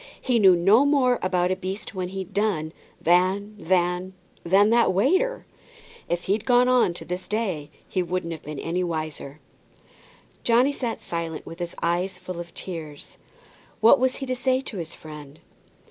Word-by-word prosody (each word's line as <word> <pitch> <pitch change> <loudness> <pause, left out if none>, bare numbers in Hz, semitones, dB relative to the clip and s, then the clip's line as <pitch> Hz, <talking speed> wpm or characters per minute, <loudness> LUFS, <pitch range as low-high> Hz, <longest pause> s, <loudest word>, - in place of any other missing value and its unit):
He 245 -3 +1
knew 190 -3 +7
no 195 +9 +5
more 270 -4 +3
about 180 -1 +1
a - - +1
beast 190 +3 -6
when 185 -2 -3
he'd 190 +1 -6
done, 185 -6 0 0.3
than 185 +4 +2
than 180 +1 0 0.3
than 195 +5 +4
that 235 0 +4
waiter. 370 - +1 0.6
If 175 0 -1
he'd 205 +3 0
gone 245 0 +4
on 245 -9 +3
to - - -7
this 180 +1 -5
day 190 -9 -2 0.2
he 185 - -1
wouldn't 175 -1 -3
have 160 - -8
been 150 0 -7
any 175 +5 -2
wiser." 155 -4 -5 1.0
Johnny 245 +4 +3
sat 240 -5 -4
silent, 165 -2 -4
with 165 - -10
his 175 -1 -5
eyes 180 +2 0
full 185 -1 -7
of 170 -1 -7
tears. 155 -5 -7 0.6
What 225 +2 +6
was 260 0 +1
he 270 - -5
to 255 -1 -2
say 255 +1 +1
to 225 - -7
his 170 -2 -6
friend? 150 -1 -11
185 Hz, 170 wpm, -25 LUFS, 170-225 Hz, 1.0 s, knew